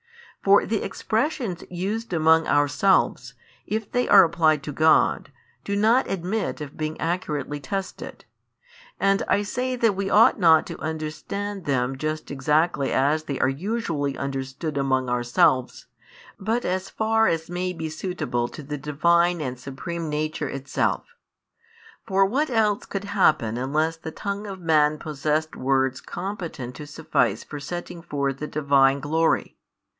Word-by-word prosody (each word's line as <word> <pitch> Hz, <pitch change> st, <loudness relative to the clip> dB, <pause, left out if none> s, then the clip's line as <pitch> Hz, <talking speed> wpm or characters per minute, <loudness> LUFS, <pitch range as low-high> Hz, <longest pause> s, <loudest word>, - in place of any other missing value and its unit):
For 200 Hz, +1 st, +5 dB
the 220 Hz, -1 st, -1 dB
expressions 220 Hz, -, -2 dB
used 200 Hz, +6 st, -3 dB
among 160 Hz, -1 st, +4 dB
ourselves, 145 Hz, +7 st, +2 dB, 0.3 s
if 215 Hz, 0 st, -3 dB
they 245 Hz, 0 st, 0 dB
are -, -, +9 dB
applied 160 Hz, -3 st, +2 dB
to 150 Hz, -, -5 dB
God, 155 Hz, +3 st, +3 dB, 0.3 s
do 200 Hz, -, -2 dB
not 225 Hz, +6 st, +3 dB
admit 195 Hz, +3 st, -2 dB
of 145 Hz, -2 st, -7 dB
being 155 Hz, 0 st, -4 dB
accurately 150 Hz, -4 st, -2 dB
tested; 190 Hz, +7 st, -6 dB, 0.7 s
and 195 Hz, 0 st, +2 dB
I 205 Hz, -, +2 dB
say 250 Hz, +5 st, -2 dB
that 230 Hz, -4 st, +2 dB
we 195 Hz, 0 st, -2 dB
ought 215 Hz, +2 st, +5 dB
not 165 Hz, -3 st, +5 dB
to -, -, -8 dB
understand 160 Hz, +6 st, -4 dB
them 130 Hz, -2 st, 0 dB
just 155 Hz, +3 st, -4 dB
exactly 150 Hz, +1 st, +1 dB
as 150 Hz, +4 st, +1 dB
they 140 Hz, -3 st, -4 dB
are -, -, +3 dB
usually 150 Hz, -, -2 dB
understood 140 Hz, +2 st, -4 dB
among 130 Hz, -2 st, +1 dB
ourselves, 125 Hz, +3 st, +1 dB, 0.5 s
but 225 Hz, +5 st, -1 dB
as 185 Hz, +1 st, -2 dB
far 225 Hz, 0 st, +2 dB
as 160 Hz, -1 st, -1 dB
may 180 Hz, +1 st, -2 dB
be 165 Hz, -2 st, -5 dB
suitable 155 Hz, -7 st, -3 dB
to 150 Hz, -, -10 dB
the 145 Hz, +1 st, -5 dB
Divine 170 Hz, +5 st, +2 dB
and 130 Hz, -3 st, -4 dB
Supreme 160 Hz, +5 st, -5 dB
Nature 150 Hz, -1 st, -2 dB
itself. 135 Hz, 0 st, -1 dB, 1.0 s
For 195 Hz, 0 st, +3 dB
what 275 Hz, +10 st, 0 dB
[else 215 Hz, -4 st, +1 dB
could 195 Hz, 0 st, -4 dB
happen], 155 Hz, -, +2 dB
unless 155 Hz, +5 st, 0 dB
the 160 Hz, -, -7 dB
tongue 200 Hz, +5 st, -5 dB
of 195 Hz, -1 st, -7 dB
man 155 Hz, -3 st, +3 dB
possessed 155 Hz, +1 st, -2 dB
words 130 Hz, 0 st, 0 dB
competent 175 Hz, -9 st, -6 dB
to 150 Hz, -, -8 dB
suffice 155 Hz, +2 st, 0 dB
for 145 Hz, -, -8 dB
setting 175 Hz, +3 st, -6 dB
forth 140 Hz, -3 st, -2 dB
the 150 Hz, -, -4 dB
Divine 140 Hz, -2 st, +3 dB
glory? 160 Hz, +3 st, 0 dB
160 Hz, 145 wpm, -24 LUFS, 145-195 Hz, 1.0 s, are